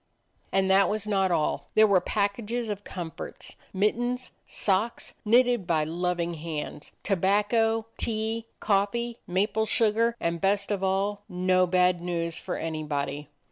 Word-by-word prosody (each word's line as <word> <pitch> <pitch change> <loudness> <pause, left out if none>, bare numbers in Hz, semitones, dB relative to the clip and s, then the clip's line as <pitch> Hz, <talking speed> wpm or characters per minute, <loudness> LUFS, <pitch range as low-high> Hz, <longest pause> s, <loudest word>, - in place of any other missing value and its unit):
And 195 0 +2
that 195 +1 +5
was 215 0 -2
not 195 -3 +2
all: 155 -4 0
there 220 - +7
were 200 -4 +4
packages 215 +3 -1
of 205 -1 -4
comforts; 175 -5 -6 0.2
mittens, 240 +6 0 0.2
socks, 205 +4 0
knitted 240 -3 +3
by 160 -2 +2
loving 175 +1 -1
hands; 155 -2 -6
tobacco, 210 +4 +2
tea, 225 0 -2
coffee, 225 +4 0
maple 210 +4 +1
sugar; 230 +2 +2
and, 170 0 -1
best 200 +1 +1
of 195 -2 -1
all, 195 +2 0
no 185 0 +2
bad 180 -1 +3
news 170 -2 -2
for - - -4
anybody. 150 -2 -3
195 Hz, 135 wpm, -27 LUFS, 175-220 Hz, 0.2 s, there